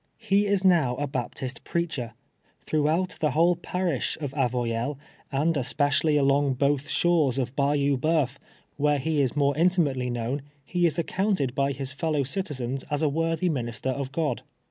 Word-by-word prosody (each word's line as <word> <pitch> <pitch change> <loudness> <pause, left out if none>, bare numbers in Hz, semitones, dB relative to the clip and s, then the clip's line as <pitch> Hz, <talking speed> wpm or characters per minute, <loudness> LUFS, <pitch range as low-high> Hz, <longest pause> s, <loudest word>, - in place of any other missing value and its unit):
He 205 -2 +2
is 200 -1 +1
now 160 -10 +4
a 145 - -2
Baptist 130 -1 -5
prcaclicr. 145 -10 -2 0.5
Throiii>;liout 155 +4 0
the 155 - +2
whole 175 +2 +5
parisli 175 -4 -2
of 145 -4 -4
Avoyelles, 125 0 -1 0.3
and 150 +4 +2
csi)ecially 145 +2 +1
alnnp^ 140 -1 +2
both 140 +1 +1
shores' 160 -7 +2
of 130 0 -2
Bayou 140 -1 +2
Bceuf, 150 -3 +1 0.4
where 145 0 +2
he 150 +2 0
is 130 -1 0
more 140 -1 +2
intimately 155 -7 +2
kjmwn, 120 +4 -2 0.2
he 175 +3 +2
is 160 - -1
accounted 170 - 0
l>y 140 -1 +1
his 135 0 -4
fellow 150 -1 0
citizens 135 -5 -3
as 145 +1 -1
a 155 - +3
M - - -4
orthy 165 +2 0
minister 125 -1 -2
of 135 0 -4
God. 155 +1 -1
145 Hz, 165 wpm, -26 LUFS, 135-165 Hz, 0.5 s, whole